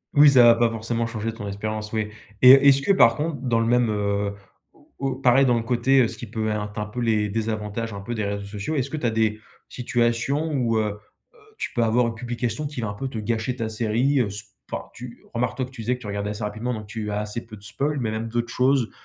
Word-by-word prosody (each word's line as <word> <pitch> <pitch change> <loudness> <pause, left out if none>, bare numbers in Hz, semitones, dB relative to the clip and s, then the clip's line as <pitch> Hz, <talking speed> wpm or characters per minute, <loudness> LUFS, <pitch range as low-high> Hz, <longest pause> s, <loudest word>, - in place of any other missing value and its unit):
Oui 145 0 +8
ça 130 -3 +7
va 120 0 +8
pas 115 0 +3
forcément 115 +1 -2
changer 115 0 -4
ton 105 -2 -7
expérience, 105 +2 -4
oui 110 -1 -1 0.3
et 130 +1 +11
heu, 135 - +6
est-ce 140 -1 +6
que 200 - +3
par 115 -12 +6
contre 155 +2 -2
dans 120 -3 +1
le 115 - +1
même 120 0 +3
heu, 100 -1 -1 0.4
au - - -24
au 135 -1 -1
pareil 130 +1 +4
dans 120 - +4
le 115 - -2
côté, 125 +3 +3
heu, 120 - +3
ce - - -9
qui 120 - -7
peut 110 0 -2
être 105 -1 -3
un 105 - -2
peu 105 +4 -7
les 110 -3 +1
désavantages 110 +1 -3
un 100 - -6
peu 100 +5 -5
des 110 -2 -2
réseaux 100 0 -3
sociaux, 105 +9 -4
est-ce 140 -1 -1
que 155 - -3
tu 130 - -1
as - - +3
des 110 -1 0 0.3
situations 120 +5 0
où 120 -5 +1
heu 110 - +2 0.5
heu, 480 - -22 0.2
tu - - -4
peux 120 - 0
avoir 115 +2 +3
une 115 - -3
publication 120 +4 -3
qui 145 -3 -7
va 110 - -2
un - - -4
peu 135 +7 -4
te 130 - -6
gâcher 110 +3 -2
ta 115 -3 -3
série? 115 +5 +1
Heu, 120 - +2
s 100 +1 -9 0.2
enfin - - -3
tu, 120 -1 -10
remarque 120 +1 -1
toi 130 - -1
que 130 - -15
tu 125 -3 -9
disais 120 +3 0
que 125 - -14
tu 105 - -8
regardais 100 0 -3
assez 105 +1 -5
rapidement 110 +4 -3
donc 105 -1 -7
tu 110 0 -5
as 105 - -1
assez 105 +2 -5
peu 110 -1 -10
de 100 - -18
spoils, 140 +7 -2
mais 115 -4 -1
même 110 +1 -3
d'autres 120 +1 -2
choses, 130 -2 +2
115 Hz, 270 wpm, -24 LUFS, 110-125 Hz, 0.5 s, et